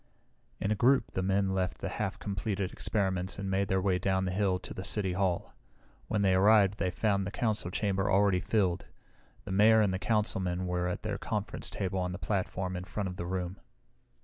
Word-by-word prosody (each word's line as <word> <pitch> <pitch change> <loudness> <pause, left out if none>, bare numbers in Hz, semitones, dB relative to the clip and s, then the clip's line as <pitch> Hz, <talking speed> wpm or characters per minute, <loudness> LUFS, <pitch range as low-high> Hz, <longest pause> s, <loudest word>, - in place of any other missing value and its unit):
In 100 - -1
a - - +3
group 125 +3 +3
the 95 - -2
men 95 0 +1
left 95 -1 -1
the - - -4
half - - -3
completed 100 -1 -3
experiments 95 -3 -1
and 100 -1 -3
made 100 +1 +1
their 95 0 +1
way 95 -1 +1
down 95 0 +1
the 90 - -1
hill 95 -1 +1
to 90 - -8
the 95 - -6
City 95 -2 0
Hall. 90 -2 -1 0.5
When 105 -2 0
they 95 -1 +4
arrived 100 +1 +5
they 95 - +1
found 100 +1 0
the - - -2
Council 110 -4 -1
chamber 100 +1 0
already 100 -1 +4
filled. 95 -3 0 0.6
The - - -7
Mayor 110 +3 +6
and 100 -3 +3
the 95 - -2
councilmen 95 -5 0
were 90 0 -1
at 90 - -3
their - - -3
conference - - -3
table 95 0 -2
on 90 0 -2
the - - -4
platform 95 -2 -2
in 90 0 -5
front 100 0 -3
of 90 - -8
the 85 - -4
room. 90 +1 -3
95 Hz, 205 wpm, -30 LUFS, 90-100 Hz, 0.6 s, Mayor